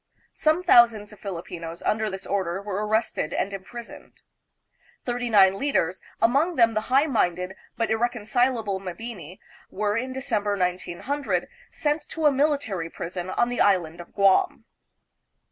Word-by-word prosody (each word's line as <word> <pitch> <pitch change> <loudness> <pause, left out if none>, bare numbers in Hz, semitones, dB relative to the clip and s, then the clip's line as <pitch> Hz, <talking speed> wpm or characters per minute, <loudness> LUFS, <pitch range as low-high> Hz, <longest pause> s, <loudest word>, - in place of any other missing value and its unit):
Some 315 +3 +1
thousands 230 - +5
of 210 - -15
Filipinos 170 -3 -7
under 215 0 0
this 190 0 -6
order 190 -2 -1
were 200 0 -3
arrested 220 -7 0
and 200 - -1
impris 215 +5 -8
oned. - - -17 0.9
Thirty 245 0 -2
nine 195 -3 +5
leaders, 190 - 0 0.2
among 280 +10 +3
them 230 -3 +4
the 215 - 0
high 270 +3 +4
minded 180 - 0 0.2
but 230 -1 0
irreconcilable 230 -2 0
Mabini, 185 -2 -7 0.3
were 205 +1 -1
in 255 +3 -2
December, 220 -6 -1
1900, 185 +10 -2 0.2
sent 300 +1 0
to 320 -1 -3
a 295 - +7
military 270 - 0
prison 175 +2 -6
on 240 +5 +1
the 245 - -1
island 175 -4 +2
of 170 - -15
Guam. 195 -2 +3
210 Hz, 145 wpm, -25 LUFS, 185-245 Hz, 0.9 s, a